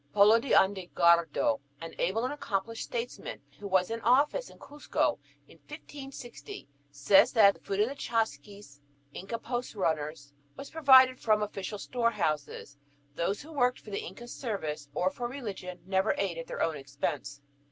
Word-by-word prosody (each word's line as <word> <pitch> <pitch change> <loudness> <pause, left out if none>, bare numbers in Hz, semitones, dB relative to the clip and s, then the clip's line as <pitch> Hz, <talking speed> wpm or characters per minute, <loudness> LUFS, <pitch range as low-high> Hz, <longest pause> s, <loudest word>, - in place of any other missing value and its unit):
Polo 210 +3 +6
de 270 - -7
Ondegardo, 170 - +3 0.2
an 165 0 -8
able 205 +6 0
and 260 - -2
accomplished 230 -4 -3
statesman, 240 0 -5 0.2
who 205 - -6
was 190 0 +2
in 230 0 -3
office 285 - +2
in - - -16
Cuzco 295 +1 -2 0.3
in - - -18
1560, 275 - -10 0.2
says 140 +7 +4
that 205 -4 +7
the - - -19
food 195 0 -4
of 215 - +3
the 270 - -4
chasquis, 210 - -4 0.3
Inca 195 +5 -5
post 240 0 -4
runners, 155 -5 -2 0.2
was 275 - -9
provided 260 -5 +6
from 215 -1 +2
official 205 0 -5
storehouses; 155 - -2 0.3
"those 180 - -2
who 320 +2 -12
worked 250 -3 +2
for 210 - -12
the 200 - -2
Inca's 240 0 -9
service, 155 - -4
or 180 +4 +1
for 240 +5 -4
religion, 205 -8 -7
never 190 +2 +1
ate 185 -4 -1
at 165 - -7
their - - -2
own 160 -2 -1
expense." 140 0 -4
205 Hz, 160 wpm, -29 LUFS, 170-240 Hz, 0.3 s, that